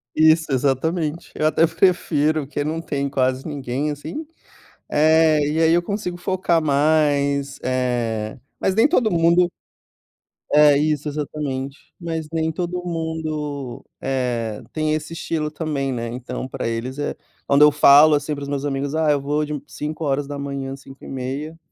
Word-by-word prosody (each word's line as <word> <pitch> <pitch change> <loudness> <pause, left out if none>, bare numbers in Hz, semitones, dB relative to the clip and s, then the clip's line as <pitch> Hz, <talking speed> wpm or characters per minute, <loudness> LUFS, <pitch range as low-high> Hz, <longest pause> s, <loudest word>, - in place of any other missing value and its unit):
Isso, 160 -1 +4
exatamente. 150 +5 -1
Eu 155 - +1
até 160 +1 +4
prefiro, 155 -3 +1
que 145 +1 -3
não 155 +2 -2
tem 140 -4 -2
quase 130 0 0
ninguém, 140 0 -3
assim, 155 - -6 0.6
eh, 155 0 +4
e 155 +2 0
aí 160 0 +4
eu 175 +1 +4
consigo 180 -2 -4
focar 175 -2 +1
mais, 140 -2 +2
eh, 120 -4 -1 0.2
mas 190 - 0
nem 225 - +5
todo 255 -8 +3
mundo 170 +1 +3 1.0
é, 150 -1 +7
isso, 150 0 0
exatamente. 145 -2 -4 0.2
Mas 165 -3 -4
nem 160 0 0
todo 180 +2 -3
mundo, 155 -5 -4 0.2
eh, 120 -5 -2
tem 155 -1 0
esse 155 +1 -3
estilo 160 -2 -2
também, 150 -3 -2
né. 120 -1 -3
Então 125 +1 -5
pra 130 -3 -4
eles 120 +4 -4
é 145 - -2 0.3
quando 140 +1 +4
eu 150 0 +8
falo, 145 +1 +7
assim, 150 +1 -2
para 145 - -8
os 140 - -5
meus 140 0 -2
amigos: 140 0 -2
"Ah, 160 -1 +1
eu 145 -1 +1
vou 150 +2 0
de 150 -2 -4
5h, 140 -2 -3
5h30 135 +3 -6
150 Hz, 150 wpm, -21 LUFS, 135-160 Hz, 1.0 s, eu